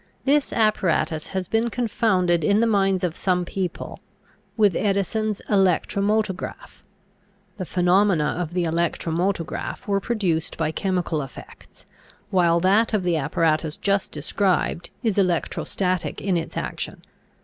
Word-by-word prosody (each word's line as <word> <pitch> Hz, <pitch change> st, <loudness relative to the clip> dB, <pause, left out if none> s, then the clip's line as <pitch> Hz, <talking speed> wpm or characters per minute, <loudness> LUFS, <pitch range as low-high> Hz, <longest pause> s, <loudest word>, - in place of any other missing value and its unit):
This 285 Hz, +1 st, +2 dB
apparatus 190 Hz, -7 st, +1 dB
has 190 Hz, -2 st, -3 dB
been 225 Hz, +4 st, +1 dB
confounded 205 Hz, -8 st, +1 dB
in 200 Hz, +6 st, +3 dB
the 230 Hz, -, +3 dB
minds 195 Hz, -4 st, +2 dB
of 170 Hz, -3 st, -1 dB
some 180 Hz, -2 st, 0 dB
people 180 Hz, -1 st, -4 dB, 0.6 s
with 205 Hz, -5 st, +4 dB
Edison's 210 Hz, +1 st, 0 dB
electromotograph. 200 Hz, -, 0 dB, 0.8 s
The 185 Hz, -3 st, -5 dB
phenomena 180 Hz, -2 st, +2 dB
of 175 Hz, 0 st, -4 dB
the 180 Hz, -, +1 dB
electromotograph 170 Hz, +5 st, -2 dB
were 200 Hz, -1 st, +2 dB
produced 185 Hz, -8 st, -1 dB
by 155 Hz, -1 st, 0 dB
chemical 175 Hz, -3 st, -1 dB
effects, 135 Hz, -, -12 dB, 0.5 s
while 170 Hz, -3 st, +3 dB
that 210 Hz, +5 st, +3 dB
of 200 Hz, -, 0 dB
the 175 Hz, -2 st, +1 dB
apparatus 155 Hz, +1 st, 0 dB
just 195 Hz, -1 st, 0 dB
described 175 Hz, +3 st, 0 dB
is 215 Hz, -4 st, +1 dB
electrostatic 180 Hz, 0 st, -1 dB
in 195 Hz, -2 st, 0 dB
its 165 Hz, -1 st, -3 dB
action. -, -, -5 dB
185 Hz, 125 wpm, -23 LUFS, 170-205 Hz, 0.8 s, with